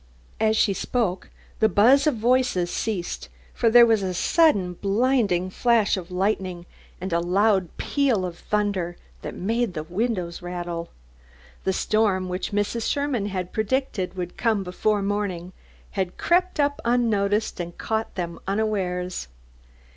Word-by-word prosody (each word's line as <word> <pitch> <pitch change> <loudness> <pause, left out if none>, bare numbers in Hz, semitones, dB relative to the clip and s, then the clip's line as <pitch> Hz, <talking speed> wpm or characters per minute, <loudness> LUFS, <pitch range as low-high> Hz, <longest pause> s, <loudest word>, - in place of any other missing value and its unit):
As 220 0 +2
she 200 - +3
spoke 190 -2 -2 0.3
the 220 - +4
buzz 255 - +5
of 300 - +2
voices 235 -6 +1
ceased, 200 -6 -3 0.2
for 230 - +2
there 240 +1 +8
was 225 -3 +3
a 185 -2 -2
sudden 200 - +3
blinding 200 -2 +1
flash 230 -1 +3
of 185 -2 -6
lightning 185 -2 -1 0.3
and 185 0 -4
a 170 - +3
loud 190 +1 +2
peal 260 -10 +1
of 175 -1 -6
thunder 200 -5 -1 0.2
that - - -6
made 225 +1 -1
the 155 - -3
windows 180 -1 -2
rattle. 175 -1 -5 0.8
The 190 - +2
storm 195 -3 +1
which 180 +1 -3
Mrs. 205 +3 -1
Sherman 280 -8 0
had 185 -3 -4
predicted 220 -4 -1
would 180 -1 -5
come 220 -4 +1
before 200 +3 0
morning, 195 -3 -2 0.4
had 190 -3 -3
crept 360 -1 +1
up 285 0 +1
unnoticed, 220 -4 +1
and 175 0 -5
caught 220 0 -2
them 170 -2 -4
unawares. 190 - -1
200 Hz, 140 wpm, -24 LUFS, 180-225 Hz, 0.8 s, there